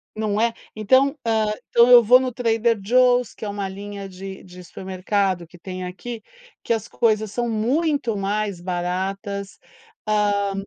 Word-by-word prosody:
Não 215 0 -1
é? 230 0 +2 0.2
Então, 260 +7 +3
ah, 220 -2 +1 0.2
então, 235 +1 +5
eu 240 -1 +9
vou 250 +4 +7
no 255 -1 -2
Trader 230 -2 +1
Joe's 250 +1 +3
que 220 - -8
é - - -3
uma 200 -1 -4
linha 200 0 -7
de 190 +1 -9
de 180 -1 -12
supermercado 185 0 -2
que 175 - -16
tem 185 +1 -7
aqui, 220 +5 -7 0.4
que 230 - +1
as 225 -1 -3
coisas 215 -3 0
são 240 +2 -2
muito 250 +1 0
mais 200 -1 -2
baratas. 190 +3 -4 0.5
Ah, 205 -1 +1
210 Hz, 160 wpm, -22 LUFS, 195-235 Hz, 0.5 s, eu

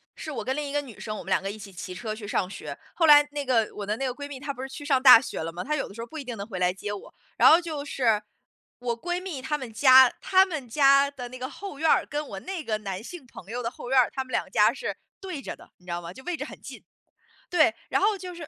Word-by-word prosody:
是 - - -7
我 - - -4
跟 260 - -1
另 295 -1 -3
一 - - -6
个 290 - +1
女 250 -6 -12
生， 215 -1 -5
我 - - -7
们 195 - -7
两 - - +3
个 195 - -4
一 205 - -6
起 200 -2 -11
骑 180 0 -7
车 215 +2 -4
去 215 -1 -8
上 195 -2 0
学。 150 -7 -8 0.2
后 330 -2 +2
来 295 -1 +8
那 290 -1 -3
个 240 -5 +2
我 205 - -5
的 210 +2 -2
那 270 - -2
个 255 - -1
闺 285 +2 -7
蜜 275 -2 -7
她 280 +1 -4
不 255 - -9
是 265 - -5
去 290 +2 -9
上 270 -3 +2
大 255 -3 +10
学 240 - -5
了 165 +1 -4
嘛， 175 +2 -6
她 300 - -1
有 285 - -2
的 200 - -13
时 - - -12
候 - - -5
不 315 +7 -8
一 - - -6
定 245 -3 -6
能 200 - -5
回 190 -5 -6
来 180 0 +3
接 205 +2 -5
我。 205 - -9 0.2
然 - - +7
后 325 - +7
就 315 -5 -5
是， 235 -7 +1 0.6
我 235 -1 -3
闺 350 0 -2
蜜 365 -8 -6
她 300 +3 -2
们 255 -6 -8
家， 260 +1 +7
她 380 0 +5
们 310 -10 -6
家 275 +2 +5
的 250 -4 -8
那 255 +1 -10
个 255 +1 -4
后 385 -2 -9
院 320 0 +2
儿， - - +4
跟 295 0 -4
我 195 - -7
那 375 -4 -5
个 220 -5 -1
男 195 -1 -5
性 330 +2 -9
朋 215 -6 -13
友 245 +1 -3
的 230 - -2
后 245 - -9
院 265 - +2
儿， 250 - +3
他 265 - -2
们 255 - -15
两 - - -1
家 210 +1 +5
是 275 - -5 0.2
对 370 -7 -6
着 - - -6
的， - - -18
你 180 - -25
知 - - -5
道 170 - -2
吗， 170 +1 -8
就 265 - -13
位 355 -2 -2
置 - - -4
很 - - -11
近。 - - -10 0.7
对， 335 -1 +4 0.2
然 - - +2
后 415 +1 +3
就 365 -2 -8
是 335 -3 -8
260 Hz, 340 characters per minute, -26 LUFS, 215-295 Hz, 0.7 s, 大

